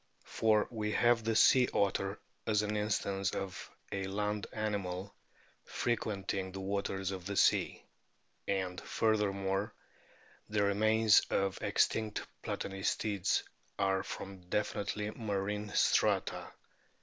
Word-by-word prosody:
For 110 -1 +2
we 105 -2 -2
have 120 -1 +3
the 115 0 0
sea 125 +3 +6
otter 100 0 +1 0.3
as 105 -1 +2
an 105 0 -2
instance 100 -2 0
of 95 -2 -5 0.2
a 100 -1 -2
land 105 +1 -2
animal 100 -3 -3 0.5
frequenting 100 -5 -2
the 95 - -6
waters 95 -1 -2
of 95 -2 -6
the 100 -1 -3
sea. - - +2 0.6
And, 95 -2 -1
furthermore, 100 -1 0 0.7
the 105 -1 +1
remains 110 +2 +5
of 95 0 0
extinct 110 -1 +1 0.2
Platanistids 100 0 -1 0.3
are 95 -1 +2
from 95 0 -7
definitely 105 +1 -1
marine 105 -1 -3
strata. - - +2
100 Hz, 110 wpm, -33 LUFS, 95-105 Hz, 0.7 s, sea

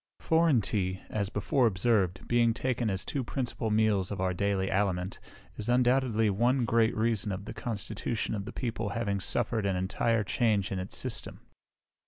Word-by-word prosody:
Foreign 160 -7 +3
tea, 95 -2 -1
as 100 -3 -1
before 130 +2 +2
observed, 95 -3 +1
being 120 -1 +3
taken 125 -3 -1
as 95 -1 -3
two 140 - -2
principal 120 -2 -2
meals 105 -3 +2
of 100 - -4
our 95 0 0
daily 100 0 0
aliment, 95 -1 0 0.4
is 105 +2 -5
undoubtedly 125 -2 +3
one 120 +5 +2
great 115 -1 +2
reason 110 -2 0
of 95 +1 -5
the - - -6
constitution 110 0 -3
of 100 -2 -3
the - - -6
people 115 -4 -3
having 100 -4 -1
suffered 115 +2 -1
an 100 -1 0
entire 105 +4 0
change 105 -2 +1
in 95 - -2
its 95 +1 -5
system. - - -3
110 Hz, 170 wpm, -29 LUFS, 100-120 Hz, 0.4 s, Foreign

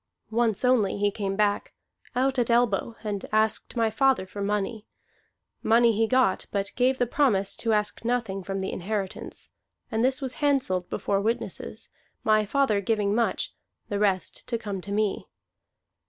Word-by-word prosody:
Once 230 0 +1
only 235 -7 +3
he 205 0 +2
came 195 -1 -3
back, 205 0 0 0.4
out 260 +1 +1
at 240 - +1
elbow, 235 -1 +2
and 205 -2 -3
asked 215 0 +1
my 225 -2 +2
father 265 -3 +2
for 200 +2 -8
money. 210 +2 -2 0.7
Money 230 +1 +5
he 225 +1 +1
got, 255 -5 +2
but 200 -1 -2
gave 255 +1 +2
the 245 - +2
promise 225 -7 +2
to 230 - -1
ask 210 0 0
nothing 230 -5 -1
from 195 +1 -4
the 190 - -2
inheritance; 195 +1 -4 0.4
and 225 0 +1
this 260 +2 +2
was 265 -3 -3
handselled 255 -11 +1
before 200 -1 0
witnesses, 225 +3 -3 0.3
my 215 -1 +3
father 220 -5 +2
giving 205 -1 +1
much, 235 +1 0 0.4
the 205 - -1
rest 195 -3 0
to 235 - -1
come 205 -4 -5
to 200 - -8
me. 210 -1 0
215 Hz, 160 wpm, -26 LUFS, 200-240 Hz, 0.7 s, Money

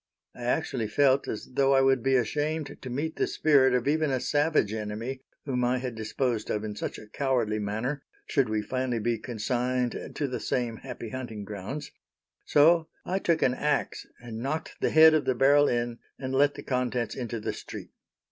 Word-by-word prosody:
I 120 - -8
actually 120 -1 0
felt 135 +3 +3
as 105 - -5
though 135 +1 +3
I 135 - +5
would 135 -1 +3
be 135 +2 +2
ashamed 150 +4 -1
to 130 - -6
meet 150 +6 -3
the - - +1
spirit 135 -4 +4
of 125 +1 0
even 155 +1 +2
a 130 -1 +1
savage 145 -7 +1
enemy 110 +5 -4 0.2
whom 125 -3 -1
I 125 +1 +2
had 125 -1 -4
disposed 115 +1 -2
of 105 - -1
in 105 -1 -4
such - - -4
a - - -10
cowardly 115 -2 0
manner, 110 +8 -2 0.2
should 135 -5 +1
we 110 -1 0
finally 130 +2 -1
be 115 +1 0
consigned 125 +2 -2
to 145 - -1
the 125 - -3
same 120 -3 -1
happy 125 -3 -7
hunting 115 -4 -6
grounds, 105 +8 -6 0.5
so 160 +2 +5 0.2
I 190 +1 0
took 170 -4 +1
an 125 - +3
axe 145 +1 -1
and 115 -2 -7
knocked 145 +5 -4
the - - +2
head 160 0 +8
of 155 -2 +2
the 130 - +1
barrel 145 +3 +5
in, 120 -1 -1 0.2
and 130 0 -4
let 145 +2 +3
the - - -8
contents 125 -3 -1
into 120 -3 -4
the - - -3
street. - - -9
125 Hz, 195 wpm, -28 LUFS, 115-140 Hz, 0.5 s, head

